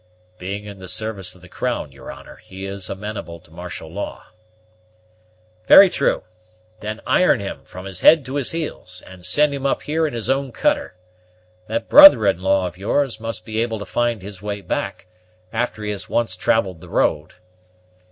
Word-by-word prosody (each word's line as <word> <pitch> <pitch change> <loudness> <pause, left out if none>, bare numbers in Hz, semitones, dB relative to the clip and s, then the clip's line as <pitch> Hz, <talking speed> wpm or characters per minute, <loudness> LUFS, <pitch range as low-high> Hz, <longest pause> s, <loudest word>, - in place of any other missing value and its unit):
"Being 100 +3 -5
in 100 -2 -10
the 95 - -9
service 100 -3 -3
of 90 - -19
the 90 - -14
crown, - - -3
your - - -10
honor, - - -13
he 95 +1 -10
is 100 -1 -4
amenable 100 -4 -6
to 80 - -22
martial 90 0 -8
law." 95 +6 -6 1.4
"Very 195 -2 +9
true; 140 - 0 0.6
then 110 +1 -6
iron 180 -9 +3
him, 100 -1 -6
from 95 +1 -10
his 95 -2 -6
head 155 -4 +6
to 130 - -6
his 140 - -1
heels, 150 - -6
and 95 -1 -13
send 145 +12 +2
him 140 0 -2
up - - -1
here 160 +1 0
in 145 - -6
his 115 - -2
own 135 0 0
cutter. - - 0 0.7
That 115 +2 -3
brother 295 - +9
in 95 -3 +2
law 95 0 +2
of 90 0 -7
yours 115 +3 0
must 115 0 -3
be 110 0 -2
able 115 -1 -2
to 100 - -7
find 120 +1 -1
the 100 0 -9
way 105 -1 -4
back, - - -4 0.5
after 115 -2 -2
he 105 - -2
has 105 +2 -6
once 115 -6 0
travelled 95 -3 0
the - - -12
road." 75 +3 0
105 Hz, 185 wpm, -21 LUFS, 95-120 Hz, 1.4 s, Very